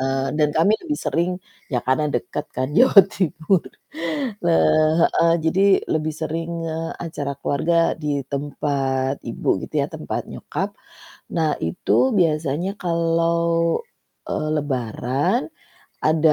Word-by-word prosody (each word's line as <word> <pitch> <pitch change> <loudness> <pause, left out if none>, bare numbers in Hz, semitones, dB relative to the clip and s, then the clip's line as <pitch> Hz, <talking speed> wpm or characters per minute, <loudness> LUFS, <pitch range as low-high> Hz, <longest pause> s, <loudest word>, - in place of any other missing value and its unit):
Eee, 135 0 0
dan 150 -1 +4
kami 165 +6 +4
lebih 300 -3 -2
sering 170 +2 +1 0.4
ya 125 - +2
karena 130 +4 +2
dekat 150 - -2
kan 130 +1 0
Jawa 245 -5 +9
Timur. 170 0 0 0.8
Heeh, 155 - +4
jadi 165 +4 +2 0.3
lebih 155 0 -1
sering, 165 +1 -3 0.2
eee, 160 +1 -3
acara 145 -4 -4
keluarga 160 +5 0 0.3
di 150 - -2 0.2
tempat 135 -2 -1
ibu - - -5 0.2
gitu - - -13
ya, - - 0
tempat - - -3
nyokap. - - -3 0.7
Nah 160 -2 +2 0.2
itu 80 - -3 0.3
biasanya 155 0 +1
kalau, 170 -1 +1 0.5
eee, 155 - -2
lebaran 135 - -1 0.6
ada 155 0 +4
155 Hz, 120 wpm, -22 LUFS, 140-170 Hz, 0.8 s, Jawa